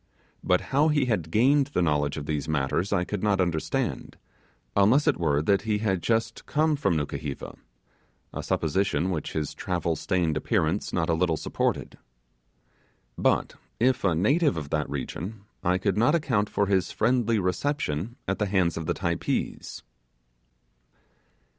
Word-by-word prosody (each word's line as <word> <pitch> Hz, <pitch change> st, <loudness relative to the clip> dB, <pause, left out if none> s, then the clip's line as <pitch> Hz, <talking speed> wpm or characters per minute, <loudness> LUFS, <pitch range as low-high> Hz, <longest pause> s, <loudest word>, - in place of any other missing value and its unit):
But 90 Hz, 0 st, +3 dB
how 145 Hz, +3 st, +4 dB
he 150 Hz, -3 st, +2 dB
had 105 Hz, -10 st, -1 dB
gained 135 Hz, -, +3 dB
the 145 Hz, -, -1 dB
knowledge 75 Hz, -3 st, +1 dB
of 75 Hz, -, -5 dB
these 75 Hz, 0 st, -3 dB
matters 75 Hz, +5 st, 0 dB
I 90 Hz, -, +2 dB
could 100 Hz, +1 st, -4 dB
not 100 Hz, -2 st, +2 dB
understand, 85 Hz, -4 st, -1 dB, 0.6 s
unless 110 Hz, +9 st, +4 dB
it -, -, +3 dB
were 75 Hz, -3 st, +1 dB
that 100 Hz, +4 st, +3 dB
he 110 Hz, -1 st, 0 dB
had 95 Hz, -4 st, 0 dB
just 115 Hz, +2 st, -1 dB
come 155 Hz, +1 st, +2 dB
from 100 Hz, -, +1 dB
Nukuheva 70 Hz, -1 st, -4 dB, 0.8 s
a -, -, -4 dB
supposition 95 Hz, +3 st, 0 dB
which 80 Hz, -5 st, -3 dB
his 75 Hz, -2 st, -2 dB
travel 85 Hz, -2 st, -2 dB
stained 85 Hz, -4 st, 0 dB
appearance 95 Hz, 0 st, 0 dB
not 80 Hz, -2 st, 0 dB
a 85 Hz, -, +2 dB
little 80 Hz, -1 st, +1 dB
supported. -, -, -2 dB, 1.2 s
But, -, -, +1 dB, 0.3 s
if 125 Hz, +2 st, +2 dB
a 90 Hz, -5 st, +2 dB
native 140 Hz, -, +2 dB
of 75 Hz, -2 st, -5 dB
that 75 Hz, -2 st, -1 dB
region, 90 Hz, -, -5 dB, 0.2 s
I 90 Hz, +1 st, +2 dB
could 100 Hz, +2 st, 0 dB
not 120 Hz, +8 st, +4 dB
account 115 Hz, -10 st, +1 dB
for 100 Hz, -, +1 dB
his 95 Hz, -2 st, +1 dB
friendly 115 Hz, -1 st, +2 dB
reception 100 Hz, -, -1 dB
at 95 Hz, -, -1 dB
the 105 Hz, -, +1 dB
hands 95 Hz, -4 st, +1 dB
of 80 Hz, -1 st, -4 dB
the -, -, 0 dB
Typees. 85 Hz, -3 st, -3 dB
95 Hz, 155 wpm, -26 LUFS, 80-110 Hz, 1.2 s, how